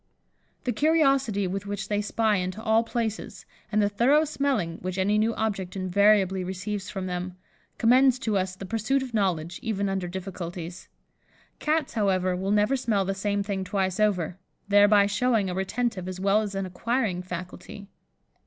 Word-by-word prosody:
The 250 - 0
curiosity 275 -6 +2
with 195 +2 -4
which 200 -1 -4
they 205 -1 0
spy 215 0 +1
into 185 +2 -3
all 220 0 +4
places, 230 -2 -4 0.3
and 215 -1 +3
the - - +3
thorough 255 +10 +3
smelling 270 - -1
which 185 +1 -4
any 205 +3 +2
new 225 +1 +1
object 195 -4 -2
invariably 190 0 +3
receives 190 +2 -4
from 190 -3 -4
them, 180 0 -4 0.4
commends 255 +2 +5
to 225 -5 -2
us 185 -1 -1
the 195 - -8
pursuit 230 +7 0
of 255 -2 -8
knowledge, 180 -5 -1
even 200 -3 -1
under 190 -2 -2
difficulties. 175 -1 -6 0.7
Cats, 310 -1 0
however, 185 -4 +1
will 190 +2 -3
never 210 +5 +3
smell 220 -7 0
the 195 - -1
same 200 +1 -1
thing 195 -2 -3
twice 190 0 -1
over, 190 -4 +1 0.3
thereby 205 0 +6
showing 210 -1 +1
a - - -3
retentive 190 0 -2
as 185 0 -5
well 200 +2 +3
as 205 -2 -4
an 195 0 -2
acquiring 200 0 -1
faculty. 180 +2 -8
200 Hz, 165 wpm, -26 LUFS, 185-220 Hz, 0.7 s, thereby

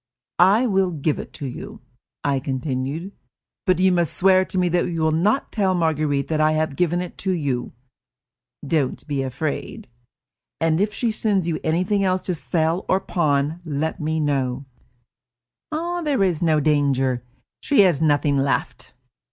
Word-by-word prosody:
"I 200 +7 +5
will 195 -5 +2
give 155 -2 -1
it - - -7
to 145 - -7
you," 125 - -7 0.4
I 140 -1 +1
continued, 135 +6 -3 0.6
"but 185 - +4
you 185 +1 +4
must 175 -3 0
swear 190 0 +5
to 185 - -5
me 180 -1 +2
that 175 0 +1
you 165 -1 -3
will 160 0 +2
not 200 - +1
tell 195 -4 +1
Marguerite 155 -4 0
that 155 -1 +1
I 155 0 +3
have 155 -2 -1
given 175 +1 +1
it 180 - -8
to 190 - -1
you." 140 -8 -2 0.9
"Don't 140 -3 -1
be 140 -2 -1
afraid." 135 +1 -4 0.7
"And 165 +1 +2
if 210 +1 +1
she 230 +1 -1
sends 205 -5 +1
you 165 - -1
anything 180 +5 +1
else 185 -1 +1
to 180 - -1
sell 165 +2 -1
or 185 - +3
pawn, 155 -3 0
let 160 +2 -3
me 160 0 -1
know." 135 -3 -1 1.1
"There 315 - -1
is 180 -5 0
no 160 -3 +3
danger. 135 -4 +1 0.4
She 285 -7 +4
has 175 -7 +3
nothing 145 -2 +2
left." 135 0 -2
160 Hz, 160 wpm, -22 LUFS, 145-185 Hz, 1.1 s, I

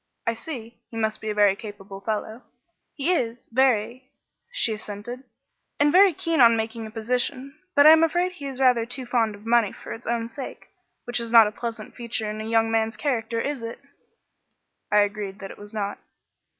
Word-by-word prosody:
"I 230 - +1
see. 235 -3 -8
He 225 - -8
must 220 -1 -1
be 220 - -4
a 210 - -2
very 205 -2 +5
capable 200 -2 -9
fellow." 220 +2 -3 0.5
"He 310 +5 +1
is, 235 -6 -2
very," 250 0 +1 0.4
she - - +1
assented, 215 +5 -7 0.5
"and 290 0 +4
very 385 +3 +7
keen 330 -2 0
on 230 -1 +7
making 220 0 -3
a - - -9
position; 250 +4 -2 0.2
but 285 - +7
I 310 - +11
am 320 0 +7
afraid 350 +3 +1
he 290 -6 -8
is 265 -1 -7
rather 250 -3 +4
too 250 +1 -3
fond 230 -3 +1
of 205 +2 -16
money 230 -3 +3
for - - -8
its 225 - -10
own 230 0 -1
sake, 255 +3 -9 0.3
which 245 0 -2
is 230 -1 -4
not 230 -2 +9
a 210 - -2
pleasant 225 -1 -6
feature 235 -2 -3
in 215 0 -5
a 220 - -5
young 225 0 +2
man's 225 -1 0
character, 230 -3 -1
is 275 +1 -2
it?" 230 0 -6 1.1
I 210 0 +6
agreed 205 -1 -2
that 195 -1 -8
it - - -13
was 205 0 -10
not. 205 -2 -3
230 Hz, 200 wpm, -25 LUFS, 215-255 Hz, 1.1 s, I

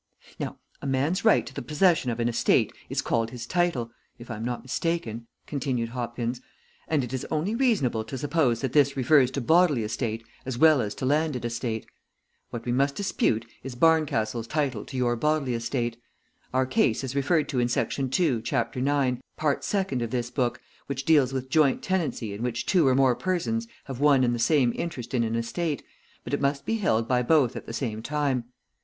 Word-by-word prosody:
"Now - - -4 0.2
a - - -4
man's 145 +8 0
right 220 - +4
to - - -9
the - - -5
possession 150 +1 +2
of 115 0 -3
an 120 - +1
estate 120 - +2 0.2
is - - -1
called 115 -1 0
his 120 -1 -7
title, 155 -7 0 0.3
if 120 0 -10
I 115 - -4
am 110 - -5
not 120 0 -3
mistaken," 125 -5 -2 0.2
continued 130 -5 -2
Hopkins, 120 0 -3 0.5
"and 150 -4 +1
it 125 +1 -6
is 130 - -2
only 160 +7 -1
reasonable 210 - +1
to 120 +5 -6
suppose 140 -4 +1
that 135 -2 -2
this 140 -2 +3
refers 130 0 +5
to 140 - -3
bodily 160 -2 +4
estate 110 +1 -3 0.2
as 130 -2 -4
well 155 -1 +6
as 105 -2 -3
to - - -4
landed 145 -3 +1
estate. 115 -1 -3 0.6
What 115 -1 -6
we 120 - -1
must 140 +3 +1
dispute 120 - 0 0.2
is 130 -1 -7
Barncastle's 120 -7 +2
title 140 -7 -1
to 130 - -7
your 120 -1 +1
bodily 150 0 0
estate. 120 0 -2 0.5
Our 130 0 +2
case 130 - +1
is 135 0 -4
referred 150 +3 +2
to 130 - 0
in 120 - +2
section 130 +2 -1
two, 135 -4 +1
chapter 120 0 -1
nine, 135 -2 +1 0.2
part 150 -2 0
second 190 -11 -1
of 115 - -2
this 120 0 -2
book, 125 -2 -1 0.3
which 140 -1 -4
deals 145 -5 +4
with 130 -1 -3
joint 150 -3 +3
tenancy 160 - -1
in 100 - -7
which 120 0 -2
two 175 -7 +3
or 130 - +4
more 135 -2 +4
persons 185 - -1 0.2
have 135 -3 -7
one 140 -2 +5
and 120 -1 +2
the 120 - -2
same 130 -1 +3
interest 135 -8 -5
in 120 -2 +2
an 115 0 -1
estate, 140 +7 -2 0.4
but - - -7
it - - 0
must 140 0 0
be 225 - 0
held 115 - +1
by 125 0 +2
both 130 -1 +3
at - - -7
the - - -5
same 115 -3 -3
time. 140 -2 -1
130 Hz, 200 wpm, -26 LUFS, 120-150 Hz, 0.6 s, well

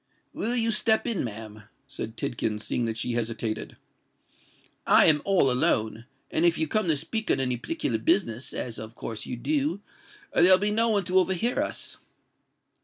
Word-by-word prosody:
"Will 235 +3 +5
you 230 -1 +5
step 220 0 +2
in, 230 -6 -2
ma'am?" 110 -2 -8 0.2
said 110 +1 -8
Tidkins; 105 -3 -3
seeing 120 - -1
that 115 -1 -3
she 120 - -2
hesitated. 115 -1 -4 1.1
"I - - +6
am 150 -2 +5
all 190 -9 +3
alone;—and 125 +5 -1
if 170 -1 +3
you 160 - 0
come 215 +3 -1
to 155 -3 +2
speak 220 +9 -4
on - - +2
any 125 -2 0
particular 305 - -3
business—as 125 - -1
of 110 +1 -9
course 110 -2 -6
you 125 - -5
do—there'll 205 - 0
be 205 +2 -1
no 230 +2 +2
one 205 -3 +1
to 185 +1 +2
overhear 190 +6 0
us." - - -5
155 Hz, 160 wpm, -26 LUFS, -, 1.1 s, I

